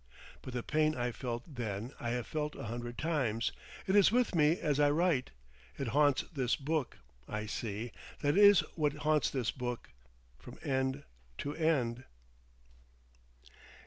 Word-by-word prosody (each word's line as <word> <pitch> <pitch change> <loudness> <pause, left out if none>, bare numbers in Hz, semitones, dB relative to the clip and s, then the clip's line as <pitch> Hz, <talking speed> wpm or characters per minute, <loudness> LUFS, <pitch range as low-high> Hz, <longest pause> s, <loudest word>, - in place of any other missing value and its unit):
But 130 - -8
the 120 - -2
pain 155 0 +2
I 120 0 -1
felt 120 -1 -4
then 120 - -5
I 120 - -3
have 120 -1 -1
felt 150 +3 -3
a - - -7
hundred 120 +1 -5
times; 135 -8 0 0.3
it 190 - +1
is 200 -2 +6
with 245 -2 +2
me 160 0 +4
as 145 -2 0
I 145 -1 +5
write. 155 -3 +2 0.5
It 135 - -2
haunts 145 +2 +3
this 130 -5 +1
book, 150 -2 -2 0.3
I 105 0 -3
see, 110 +1 -4 0.3
that 145 +2 +3
is 205 -1 +8
what 150 -3 +1
haunts 150 0 +2
this 125 -4 -1
book, 125 -2 -5 0.5
from - - -11
end 130 +1 0 0.3
to 145 +1 -4
end. 130 -7 +1
135 Hz, 150 wpm, -33 LUFS, 120-155 Hz, 0.5 s, is